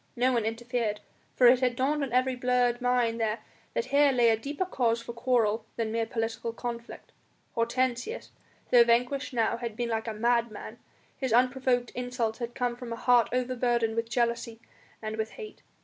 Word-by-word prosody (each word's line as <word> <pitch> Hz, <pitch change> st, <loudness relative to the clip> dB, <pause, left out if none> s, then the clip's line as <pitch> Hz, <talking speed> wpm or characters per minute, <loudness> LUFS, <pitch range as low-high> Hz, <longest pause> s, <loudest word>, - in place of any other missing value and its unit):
No 255 Hz, +1 st, +2 dB
one 230 Hz, -3 st, +1 dB
interfered, 225 Hz, -1 st, -2 dB, 0.4 s
for 250 Hz, -, +4 dB
it 245 Hz, +1 st, +7 dB
had 250 Hz, -2 st, +1 dB
dawned 285 Hz, +4 st, 0 dB
on 275 Hz, -3 st, -2 dB
every 255 Hz, +1 st, +2 dB
blurred 245 Hz, -1 st, +1 dB
mind 245 Hz, -2 st, +1 dB
there 220 Hz, 0 st, 0 dB, 0.4 s
that -, -, 0 dB
here 285 Hz, 0 st, +5 dB
lay 240 Hz, -3 st, +4 dB
a -, -, +4 dB
deeper 285 Hz, +10 st, -3 dB
cause 235 Hz, -9 st, 0 dB
for 235 Hz, 0 st, -8 dB
quarrel 235 Hz, -3 st, +1 dB
than 225 Hz, -2 st, -2 dB
mere 225 Hz, 0 st, -1 dB
political 225 Hz, -1 st, -3 dB
conflict. 235 Hz, 0 st, -7 dB, 0.4 s
Hortensius, 250 Hz, -, -1 dB, 0.4 s
though 245 Hz, -1 st, +8 dB
vanquished 245 Hz, +5 st, +1 dB
now, 235 Hz, -1 st, +1 dB
had 235 Hz, -3 st, -5 dB
been 240 Hz, +1 st, -2 dB
like 225 Hz, 0 st, -2 dB
a 225 Hz, -, -2 dB
madman; 235 Hz, -1 st, -1 dB, 0.4 s
his 260 Hz, -3 st, -3 dB
unprovoked 250 Hz, 0 st, +2 dB
insults 245 Hz, -2 st, -3 dB
had 240 Hz, 0 st, -5 dB
come 245 Hz, -1 st, -1 dB
from 245 Hz, -1 st, -8 dB
a -, -, -2 dB
heart 245 Hz, 0 st, +3 dB
overburdened 240 Hz, -2 st, 0 dB
with 230 Hz, 0 st, -2 dB
jealousy 235 Hz, -1 st, -1 dB, 0.4 s
and 215 Hz, 0 st, -4 dB
with 220 Hz, 0 st, -3 dB
hate. 430 Hz, -2 st, -10 dB
240 Hz, 180 wpm, -28 LUFS, 230-250 Hz, 0.4 s, though